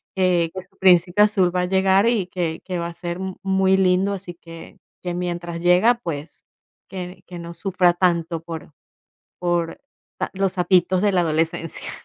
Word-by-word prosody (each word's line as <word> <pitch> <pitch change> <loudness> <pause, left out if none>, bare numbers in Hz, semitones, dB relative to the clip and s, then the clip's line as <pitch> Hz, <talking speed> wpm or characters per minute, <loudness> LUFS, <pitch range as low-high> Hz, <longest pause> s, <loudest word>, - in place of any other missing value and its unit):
que 180 -3 +2
que 185 - -5
su 195 +1 -29
príncipe 180 +1 +4
azul 190 -4 +2
va 180 - +2
a - - 0
llegar 190 +2 +3
y 205 -7 0
que 170 -3 -3
que 180 -2 -3
va 170 - -2
a 170 - -7
ser 175 +1 -5
mu 190 -1 -4
muy 190 0 +3
lindo, 190 +1 +2
así 185 -2 -6
que 165 -1 -12 0.2
que 175 -1 -3
mientras 175 -1 -4
llega, 180 +7 +5
pues 150 -2 -6 0.5
que 180 -1 -7
que 175 - -8
no 170 0 -8
sufra 180 -2 +2
tanto 170 -2 0
por 165 -2 -8 0.7
por 175 - -1 0.5
los 190 -1 0
sapitos 180 0 +2
de 205 -1 +3
la 180 - +3
adolescencia. 165 0 -2
180 Hz, 175 wpm, -22 LUFS, 170-190 Hz, 0.7 s, llega